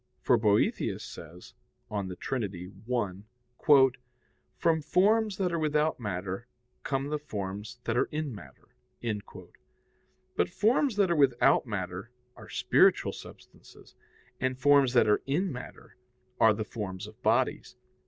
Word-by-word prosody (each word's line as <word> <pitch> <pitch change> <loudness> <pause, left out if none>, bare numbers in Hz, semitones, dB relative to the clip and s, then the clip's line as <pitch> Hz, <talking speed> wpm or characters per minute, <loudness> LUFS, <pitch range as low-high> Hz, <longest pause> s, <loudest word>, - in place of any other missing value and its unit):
For 125 - +3
Boethius 105 -3 +1
says 85 +2 -11 0.4
(De 100 -3 -3
Trin. 130 +4 -3 0.4
i): 120 - +2 0.7
"From 160 -1 +2
forms 205 +6 +2
that 185 -3 0
are 170 - 0
without 155 -1 +1
matter 95 +1 -4 0.3
come 135 +1 -2
the 150 0 -2
forms 105 -3 -6
that - - -1
are - - +3
in 150 -3 -3
matter." 70 -11 -13 1.7
But 85 - +1
forms 235 - +2
that 200 -4 +2
are - - +3
without 135 -3 +3
matter 95 0 -4 0.3
are - - -13
spiritual - - +3
substances, - - -14 0.5
and 130 0 -1
forms 140 -1 +4
that 120 - +5
are 105 - +3
in 175 +7 0
matter 125 -2 -10 0.4
are 110 -1 +5
the 110 0 -3
forms 100 -4 -6
of 110 +3 -14
bodies. 120 +4 0
125 Hz, 130 wpm, -29 LUFS, 105-150 Hz, 1.7 s, that